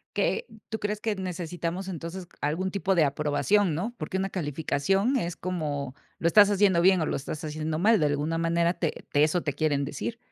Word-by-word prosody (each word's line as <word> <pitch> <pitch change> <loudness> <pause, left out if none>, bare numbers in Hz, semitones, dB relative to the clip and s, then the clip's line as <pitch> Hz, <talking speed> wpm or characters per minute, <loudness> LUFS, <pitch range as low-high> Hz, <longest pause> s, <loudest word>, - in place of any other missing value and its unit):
¿Que 475 - 0 0.2
tú 220 - -3
crees 210 0 -2
que 220 -1 -1
necesitamos, 180 0 -4
entonces, 175 0 -6
algún 170 +6 0
tipo 195 -1 0
de 165 -4 +4
aprobación?, 150 +6 +1
¿No?, 215 +9 -3
porque 170 +5 -3
una 195 0 -1
calificación 180 - 0
es 175 -8 -2
como, 150 -7 -3 0.2
lo 165 - -1
estás 205 +4 +7
haciendo 195 -4 +4
bien 190 0 +5
o 160 - 0
lo - - -1
estás 145 +3 -5
haciendo 155 +1 -3
mal, 215 +4 +4
de 150 - +2
alguna 145 +3 0
manera 170 +1 +1
te 165 - -1 0.2
te 145 +1 +4
eso 170 +3 +1
te 145 - -2
quieren 145 -3 +1
decir. 225 +12 -4
170 Hz, 200 wpm, -27 LUFS, 155-195 Hz, 0.2 s, estás